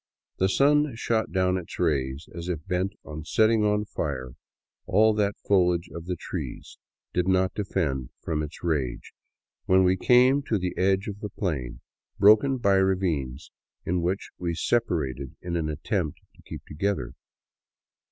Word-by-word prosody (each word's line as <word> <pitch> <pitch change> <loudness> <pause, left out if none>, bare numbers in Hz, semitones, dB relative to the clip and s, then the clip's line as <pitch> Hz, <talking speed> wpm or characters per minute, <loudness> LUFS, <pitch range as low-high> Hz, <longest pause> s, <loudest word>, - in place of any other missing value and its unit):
The 95 - +3
sun 145 +4 +3
shot 115 -1 -1
down 95 -1 +2
its 90 -3 -7
rays 70 -4 -1
as 85 +1 -6
if 80 -4 -3
bent 95 +2 -1
on 75 0 -7
setting 110 +6 +3
on 105 0 +1
fire 65 -10 -4 0.6
all 110 +4 +4
that 105 -1 0
the - - -26
foliage 90 -3 +2
of 85 0 -8
the 90 - -1
trees - - -7 0.3
did 90 0 +1
not 95 0 +2
defend 80 - -2
from 80 -2 -2
its 75 +1 -7
rage, 70 -8 -2 0.5
when 95 0 +5
we 90 +1 +3
came 125 +7 +5
to 110 - +1
the 90 -1 -3
edge 95 +1 +1
of 105 -1 -5
the 105 - -5
plain, 75 - -3 0.4
broken 110 +7 +5
by 100 -5 +3
ravines 85 -9 0 0.3
in 90 +1 0
which 90 +4 -2
we 85 -1 -1
sepa 120 +7 +1
rated 65 0 -6
in 85 -1 -4
an 80 -2 -1
attempt 75 +1 -2
to - - -20
keep - - -9
together. 80 -6 -2
90 Hz, 160 wpm, -26 LUFS, 80-105 Hz, 0.6 s, when